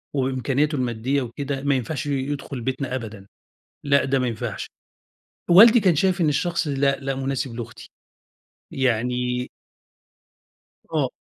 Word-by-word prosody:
وبإمكانياته 135 Hz, +3 st, 0 dB
المادية 125 Hz, +2 st, -1 dB
وكده 135 Hz, +3 st, -4 dB
ما 140 Hz, -1 st, +2 dB
ينفعش 130 Hz, +3 st, -3 dB
ي -, -, -2 dB
يدخل 140 Hz, -1 st, -3 dB
بيتنا 130 Hz, +1 st, -3 dB
أبدًا، 110 Hz, -5 st, -7 dB, 0.6 s
لأ 140 Hz, -1 st, +3 dB
ده 135 Hz, 0 st, +1 dB
ما 125 Hz, -, 0 dB
ينفعش، 115 Hz, -2 st, -4 dB, 0.8 s
والدي 225 Hz, +6 st, +8 dB
كان 180 Hz, -6 st, +3 dB
شايف 185 Hz, +2 st, +1 dB
إن 160 Hz, -, +3 dB
الشخص 165 Hz, +3 st, 0 dB
لأ، 140 Hz, 0 st, +1 dB
لأ 135 Hz, 0 st, -2 dB
مناسب 135 Hz, -2 st, -3 dB
لأختي، 115 Hz, -1 st, -8 dB, 0.8 s
يعني 125 Hz, 0 st, 0 dB, 1.4 s
آه. -, -, +1 dB
135 Hz, 130 wpm, -23 LUFS, 125-145 Hz, 1.4 s, والدي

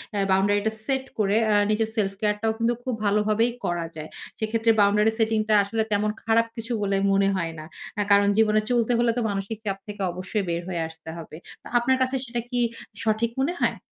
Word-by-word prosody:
এ -, -, 0 dB
boundary 200 Hz, +2 st, +3 dB
টা -, -, +1 dB
set 265 Hz, -1 st, 0 dB
করে 210 Hz, -1 st, +2 dB
আ -, -, +4 dB, 0.2 s
নিজের 220 Hz, +1 st, +1 dB
self-care 210 Hz, +1 st, 0 dB
টাও 225 Hz, 0 st, +2 dB
কিন্তু 230 Hz, +1 st, +2 dB
খুব 255 Hz, -, -2 dB
ভালোভাবেই 210 Hz, +3 st, +2 dB
করা 175 Hz, -1 st, -1 dB
যায়। 155 Hz, 0 st, -7 dB, 0.3 s
সেক্ষেত্রে 225 Hz, +1 st, +2 dB
boundary 210 Hz, +2 st, +4 dB
setting 220 Hz, -1 st, +2 dB
টা -, -, +4 dB
আসলে 220 Hz, +3 st, -1 dB
তেমন 210 Hz, +1 st, +2 dB
খারাপ 230 Hz, +1 st, +3 dB
কিছু 230 Hz, 0 st, -6 dB
বলে 200 Hz, -1 st, +1 dB
মনে 195 Hz, 0 st, +3 dB
হয় 165 Hz, -3 st, -2 dB
না। 155 Hz, -, -8 dB, 0.4 s
এ -, -, +2 dB
কারণ 200 Hz, 0 st, +6 dB
জীবনে 215 Hz, -1 st, +4 dB
চলতে 240 Hz, -1 st, +2 dB
হলে 235 Hz, -1 st, +3 dB
তো -, -, +1 dB
মানসিক 200 Hz, +2 st, -3 dB
চাপ 195 Hz, -2 st, -1 dB
থেকে 205 Hz, -1 st, -7 dB
অবশ্যই 185 Hz, +4 st, -3 dB
বের 170 Hz, 0 st, -1 dB
হয়ে 175 Hz, -2 st, -2 dB
আসতে 160 Hz, 0 st, -12 dB
হবে। 160 Hz, -1 st, -9 dB, 0.3 s
তো -, -, -10 dB
আপনার 260 Hz, +2 st, +2 dB
কাছে 260 Hz, +1 st, +1 dB
সেটা 240 Hz, -1 st, -3 dB
কি 245 Hz, -1 st, -1 dB, 0.4 s
সঠিক 225 Hz, +1 st, +1 dB
মনে 300 Hz, +6 st, +1 dB
হয়? -, -, +1 dB
215 Hz, 205 wpm, -25 LUFS, 195-230 Hz, 0.4 s, কারণ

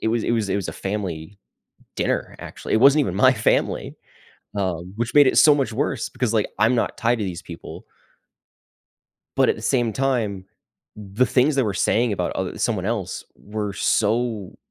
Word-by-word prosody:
it 110 Hz, -, +1 dB
was 115 Hz, 0 st, 0 dB
it -, -, -1 dB
was 110 Hz, -4 st, 0 dB
it -, -, 0 dB
was 100 Hz, -4 st, -3 dB
a -, -, -3 dB
family 95 Hz, -2 st, -5 dB, 0.6 s
dinner, -, -, -2 dB
actually. -, -, -5 dB
It 110 Hz, -, +3 dB
wasn't 140 Hz, +4 st, +6 dB
even 110 Hz, -11 st, -1 dB
my 130 Hz, +7 st, +5 dB
family, 105 Hz, -5 st, 0 dB, 0.6 s
um, 90 Hz, -2 st, -3 dB
which 115 Hz, +1 st, -3 dB
made 145 Hz, -2 st, +7 dB
it -, -, +2 dB
so 150 Hz, -2 st, +7 dB
much 135 Hz, -5 st, -1 dB
worse 135 Hz, -1 st, -2 dB
because, 125 Hz, -3 st, -2 dB
like, 110 Hz, -, +1 dB
I'm 115 Hz, +4 st, +4 dB
not 115 Hz, -, -1 dB
tied 120 Hz, +1 st, +1 dB
to 105 Hz, -, -1 dB
these 90 Hz, -1 st, -5 dB
people 85 Hz, -2 st, -10 dB, 1.5 s
but -, -, +4 dB
at -, -, +2 dB
the -, -, -10 dB
same 120 Hz, -3 st, +1 dB
time, 115 Hz, -8 st, -1 dB, 0.5 s
the 105 Hz, +4 st, -1 dB
things 135 Hz, +4 st, +2 dB
they 135 Hz, -, +2 dB
were 105 Hz, -3 st, -1 dB
saying 115 Hz, +1 st, +1 dB
about 90 Hz, -3 st, -2 dB
oth 95 Hz, -1 st, -4 dB
someone 100 Hz, -6 st, -1 dB
else 105 Hz, -5 st, -3 dB
were 105 Hz, -1 st, -5 dB
so 115 Hz, -4 st, 0 dB
110 Hz, 190 wpm, -22 LUFS, 100-125 Hz, 1.5 s, made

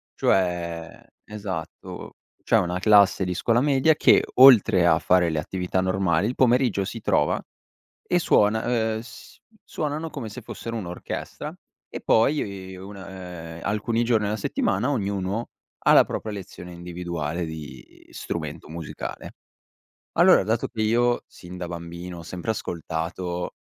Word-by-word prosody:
Cioè 85 Hz, -3 st, -1 dB, 0.2 s
esatto, 95 Hz, -6 st, -7 dB, 0.3 s
cioè -, -, +3 dB
una 90 Hz, +1 st, 0 dB
classe 100 Hz, -1 st, +5 dB
di 90 Hz, -, -2 dB
scuola 115 Hz, +6 st, +2 dB
media 145 Hz, +2 st, +3 dB
che -, -, +5 dB
oltre 120 Hz, -9 st, +7 dB
a 80 Hz, -2 st, +4 dB
fare 90 Hz, -1 st, +3 dB
le 80 Hz, -, -1 dB
attività 90 Hz, +3 st, -2 dB
normali, 95 Hz, -1 st, +1 dB
il 125 Hz, -, -3 dB
pomeriggio 120 Hz, -5 st, +3 dB
si 115 Hz, +3 st, -6 dB
trova -, -, +1 dB, 0.7 s
e 180 Hz, -, +2 dB
suona, 110 Hz, -9 st, +3 dB, 0.3 s
ehm, -, -, -4 dB
s 115 Hz, -, -13 dB, 0.3 s
suonano 155 Hz, +1 st, -3 dB
come 135 Hz, -8 st, -6 dB
se 115 Hz, +4 st, -9 dB
fossero 115 Hz, +1 st, -6 dB
un'orchestra 90 Hz, -5 st, -6 dB, 0.4 s
e -, -, -7 dB
poi 100 Hz, -7 st, +1 dB
una, 95 Hz, -3 st, -9 dB
ehm, -, -, -10 dB
alcuni 110 Hz, +3 st, 0 dB
giorni 115 Hz, -3 st, +2 dB
alla 105 Hz, +1 st, -1 dB
settimana 145 Hz, -, 0 dB
ognuno 100 Hz, -2 st, -2 dB, 0.3 s
ha -, -, +5 dB
la -, -, +8 dB
propria 110 Hz, -, -5 dB
lezione 90 Hz, -3 st, -9 dB
individuale 85 Hz, -2 st, -4 dB
di 75 Hz, -5 st, -10 dB
strumento -, -, -5 dB
musicale. 80 Hz, -1 st, -7 dB, 0.8 s
Allora, -, -, +6 dB
dato 110 Hz, +3 st, 0 dB
che 110 Hz, -, -6 dB
io 120 Hz, +2 st, +2 dB
sin 90 Hz, 0 st, -12 dB
da 90 Hz, -, -4 dB
bambino 85 Hz, +1 st, -7 dB
ho -, -, -8 dB
sempre 90 Hz, +5 st, -3 dB
ascoltato 85 Hz, -1 st, -4 dB
95 Hz, 140 wpm, -24 LUFS, 85-115 Hz, 0.8 s, la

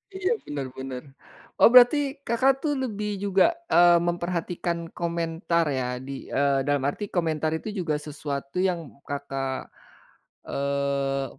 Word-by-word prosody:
Iya, 380 Hz, 0 st, -1 dB, 0.2 s
bener 145 Hz, -2 st, -4 dB
bener. 130 Hz, -1 st, -6 dB, 0.6 s
Oh, -, -, +8 dB
berarti 250 Hz, +3 st, +8 dB, 0.3 s
Kakak, 265 Hz, +3 st, +3 dB
tuh 300 Hz, -2 st, +1 dB
lebih 210 Hz, -4 st, -3 dB
juga, 200 Hz, -, +3 dB, 0.2 s
eee, 175 Hz, 0 st, +7 dB
memperhatikan 170 Hz, -1 st, -2 dB
komentar 170 Hz, 0 st, -1 dB
ya, 130 Hz, -2 st, -1 dB, 0.2 s
di 135 Hz, 0 st, -7 dB
eee, 140 Hz, 0 st, +2 dB
dalam 145 Hz, -2 st, +1 dB
arti 145 Hz, +9 st, -2 dB
komentar 160 Hz, -4 st, -1 dB
itu 160 Hz, -, -5 dB
juga 160 Hz, -4 st, 0 dB
sesuatu 145 Hz, 0 st, -5 dB
yang 175 Hz, -5 st, -1 dB, 0.2 s
Kakak, 135 Hz, -2 st, -4 dB, 0.8 s
eee, 140 Hz, -1 st, -1 dB
165 Hz, 125 wpm, -26 LUFS, 140-180 Hz, 0.8 s, Oh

